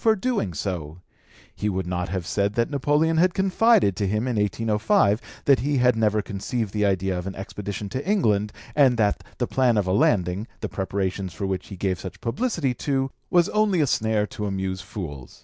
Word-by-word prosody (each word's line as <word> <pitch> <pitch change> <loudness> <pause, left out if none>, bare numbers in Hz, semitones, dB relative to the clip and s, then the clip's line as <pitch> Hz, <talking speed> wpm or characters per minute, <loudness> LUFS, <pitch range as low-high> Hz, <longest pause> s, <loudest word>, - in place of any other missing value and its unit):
for 220 -1 +5
doing 210 - -1
so; 85 -2 -4 0.6
he 105 - -1
would 95 -2 -2
not 90 0 -2
have 95 -1 -3
said 100 +3 0
that 115 +4 +1
Napoleon 150 +3 +2
had 180 +2 +3
confided 195 - +3
to 100 - 0
him 105 +5 0
in 125 - -1
1805 105 +1 +2 0.2
that 140 -2 +5
he 140 +3 0
had 125 -1 +4
never 110 -1 +1
conceived 105 +2 -3
the 105 -1 0
idea 95 -1 0
of 90 - -6
an 95 - -5
expedition 100 +1 -5
into 130 +8 -4
England, 105 - +2 0.2
and 135 -5 +5
that 105 -2 +1
the 120 - 0
plan 125 -2 +2
of 105 - +2
a 95 - 0
landing, 95 +1 +2
the - - -3
preparations 95 -1 -2
for 100 - -3
which 95 -1 -3
he 95 - -8
gave 95 -1 -1
such 95 0 -8
publicity 160 - -1
to, 135 +2 -1 0.2
was 175 -1 +4
only 210 -4 +2
a 150 - +4
snare 110 -4 +1
to 105 0 -5
amuse 95 -1 -3
fools. 75 -10 -8
105 Hz, 200 wpm, -24 LUFS, 95-135 Hz, 0.6 s, for